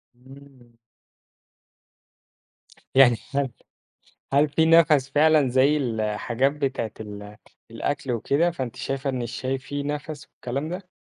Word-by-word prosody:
امم. 130 Hz, -2 st, -17 dB, 2.2 s
يعني 125 Hz, -4 st, +7 dB, 0.2 s
هل 140 Hz, -2 st, +1 dB, 0.8 s
هل 145 Hz, +2 st, +4 dB
في 160 Hz, +2 st, +2 dB
نَفَس 155 Hz, -5 st, +5 dB
فعلًا 150 Hz, -1 st, +4 dB
زَي 135 Hz, +4 st, +3 dB
الحاجات 115 Hz, +1 st, 0 dB
بتاعة 135 Hz, -6 st, -3 dB
ال 105 Hz, -1 st, -9 dB, 0.3 s
الأكل 135 Hz, +2 st, -3 dB
وكده، 145 Hz, +9 st, +1 dB
فأنتِ 130 Hz, -6 st, -5 dB
شايفة 135 Hz, +2 st, -3 dB
إن 130 Hz, -2 st, -2 dB
الشاي 130 Hz, +3 st, -3 dB
فيه 140 Hz, +2 st, -5 dB
نَفَس، 150 Hz, 0 st, -5 dB
والكلام 140 Hz, +6 st, -4 dB
ده؟ 180 Hz, +1 st, -7 dB
135 Hz, 115 wpm, -24 LUFS, 120-145 Hz, 2.2 s, يعني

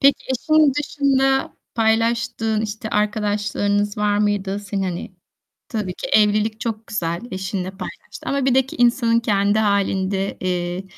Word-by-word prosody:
Peki, 275 Hz, +1 st, +4 dB
eşin 305 Hz, +3 st, +3 dB
dışında 270 Hz, -2 st, +1 dB, 0.2 s
paylaştığın, 225 Hz, -1 st, +1 dB
işte, 215 Hz, 0 st, -4 dB
arkadaşlarınız 205 Hz, -1 st, 0 dB
var 205 Hz, 0 st, +2 dB
mıydı 205 Hz, -1 st, 0 dB
senin, 200 Hz, -1 st, -3 dB
hani, 180 Hz, -1 st, -4 dB, 0.6 s
tabii 210 Hz, -5 st, -3 dB
ki -, -, -6 dB
evlilik 215 Hz, +1 st, +3 dB
çok 225 Hz, -1 st, -4 dB
güzel, 170 Hz, -4 st, -2 dB
eşinle 185 Hz, 0 st, -3 dB
paylaştığın 195 Hz, +1 st, -8 dB
ama 275 Hz, -1 st, 0 dB
bir 260 Hz, -2 st, +3 dB
de 265 Hz, -1 st, +4 dB
ki -, -, -9 dB
insanın 235 Hz, -1 st, +3 dB
kendi 205 Hz, -1 st, +2 dB
hâlinde, 195 Hz, -1 st, 0 dB
eee, 180 Hz, 0 st, -2 dB
210 Hz, 135 wpm, -21 LUFS, 195-230 Hz, 0.6 s, Peki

